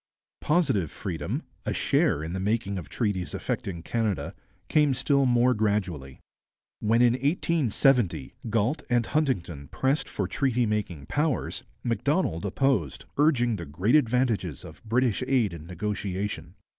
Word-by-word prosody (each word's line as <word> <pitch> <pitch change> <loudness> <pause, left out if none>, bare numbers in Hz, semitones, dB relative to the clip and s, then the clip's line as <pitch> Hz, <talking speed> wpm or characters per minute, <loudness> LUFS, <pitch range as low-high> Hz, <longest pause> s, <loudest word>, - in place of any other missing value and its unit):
Positive 135 - +1
freedom, 80 -5 -4 0.2
a - - -2
share 75 - +2
in 80 +2 -4
the 95 - -2
making 100 -1 -1
of 85 - -10
treaties 100 -6 -2
affecting 85 -4 -3
Canada, 110 -3 -1 0.3
came 150 -3 +3
still 140 0 +2
more 125 +1 +4
gradually. 95 - -1 0.6
When 115 +3 +3
in 120 -1 +5
1870 135 - +1 0.2
Galt 115 +7 +1
and 120 -2 +2
Huntington 90 - -1
pressed 135 +3 0
for 100 - -2
treaty 125 +3 +1
making 100 -9 -2
powers, 150 -2 -1 0.2
Macdonald 115 - 0
opposed, 100 - 0
urging 125 -7 +3
the 85 - -6
great 90 +11 0
advantages 120 - +2
of - - -12
British 115 0 +1
aid 125 -8 +2
in 80 -1 -9
negotiation. 95 -2 -4
110 Hz, 130 wpm, -27 LUFS, 90-130 Hz, 0.6 s, in